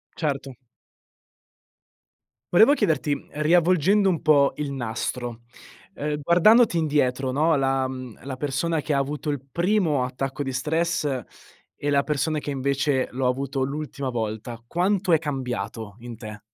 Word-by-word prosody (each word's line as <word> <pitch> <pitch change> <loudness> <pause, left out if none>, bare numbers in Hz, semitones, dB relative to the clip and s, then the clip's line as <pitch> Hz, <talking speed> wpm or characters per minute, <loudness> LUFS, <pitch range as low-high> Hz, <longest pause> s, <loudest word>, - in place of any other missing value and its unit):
Certo. 140 -4 -3 2.0
Volevo 220 +10 +7
chiederti, 150 - +1
mhmm, - - -7
riavvolgendo 180 +4 +4
un 175 -4 +1
po' 145 -2 +4
il 145 -2 -3
nastro, 120 -1 -4 0.5
ehm, 150 0 -3
guardandoti 180 - +5
indietro, 135 -4 +1
no, 155 +3 +2
la 135 -1 +1
mhmm, 130 -3 -8
la 135 -1 -5
persona 150 +4 -1
che 150 0 -2
ha - - +2
avuto 145 +2 -3
il 145 - -3
primo 170 -7 +1
attacco 135 +2 -4
di 135 - -4
stress 150 -2 -1 0.5
e 145 - -3
la 140 -1 +3
persona 155 +1 -1
che 145 - -6
invece 140 0 0
l'ho 130 +1 -1
avuto 135 +1 -1
l'ultima 140 -1 -4
volta 115 0 -4
quanto 185 - 0
è 160 - +5
cambiato, 115 -7 -4
in 120 0 -8
te? 110 -1 -9
140 Hz, 140 wpm, -24 LUFS, 130-160 Hz, 2.0 s, Volevo